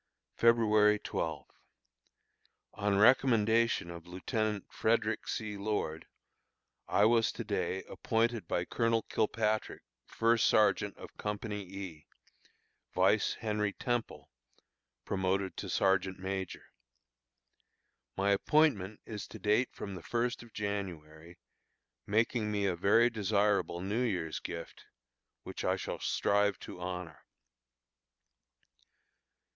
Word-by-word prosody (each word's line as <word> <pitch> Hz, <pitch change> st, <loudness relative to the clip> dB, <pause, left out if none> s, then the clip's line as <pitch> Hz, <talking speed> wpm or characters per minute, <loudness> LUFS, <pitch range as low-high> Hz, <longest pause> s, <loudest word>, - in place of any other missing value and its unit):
February 110 Hz, -3 st, +4 dB
12. -, -, -3 dB, 1.3 s
On 100 Hz, -1 st, 0 dB
recommendation 115 Hz, -4 st, +4 dB
of 85 Hz, 0 st, -10 dB
Lieutenant 105 Hz, +3 st, -2 dB
Frederick 110 Hz, -1 st, 0 dB
C. 105 Hz, -2 st, -3 dB
Lord, 100 Hz, -6 st, -3 dB, 0.8 s
I 105 Hz, -, +4 dB
was 115 Hz, 0 st, +4 dB
to -, -, -5 dB
day 95 Hz, -, -2 dB
appointed 115 Hz, -4 st, -1 dB
by 85 Hz, -, -1 dB
Colonel 115 Hz, +3 st, +1 dB
Kilpatrick 110 Hz, 0 st, -1 dB, 0.2 s
First 115 Hz, 0 st, +2 dB
Sergeant 105 Hz, -1 st, +3 dB
of -, -, -11 dB
Company 105 Hz, 0 st, -4 dB
E, 95 Hz, -5 st, -8 dB, 0.9 s
vice -, -, +3 dB
Henry 105 Hz, -2 st, -1 dB
Temple, 120 Hz, +1 st, -3 dB, 0.7 s
promoted 95 Hz, 0 st, -1 dB
to -, -, -5 dB
Sergeant 95 Hz, -1 st, +1 dB
Major. 95 Hz, -1 st, -4 dB, 1.5 s
My 100 Hz, +1 st, +2 dB
appointment 105 Hz, -4 st, +2 dB
is 105 Hz, -2 st, -6 dB
to -, -, -10 dB
date 105 Hz, +4 st, +1 dB
from 100 Hz, -, -7 dB
the 90 Hz, -, -7 dB
first 120 Hz, +5 st, -1 dB
of 120 Hz, -1 st, -14 dB
January, 85 Hz, -6 st, -5 dB, 0.7 s
making 110 Hz, +1 st, +1 dB
me 100 Hz, -1 st, 0 dB
a 95 Hz, -3 st, +1 dB
very 115 Hz, +7 st, +4 dB
desirable 105 Hz, -4 st, +1 dB
New 100 Hz, +6 st, -1 dB
Year's 90 Hz, -10 st, -1 dB
gift, 85 Hz, -1 st, -8 dB, 0.6 s
which -, -, -6 dB
I -, -, +2 dB
shall -, -, -5 dB
strive 100 Hz, -1 st, +1 dB
to 90 Hz, -, -9 dB
honor. 90 Hz, -3 st, -6 dB
105 Hz, 110 wpm, -32 LUFS, 95-110 Hz, 1.5 s, February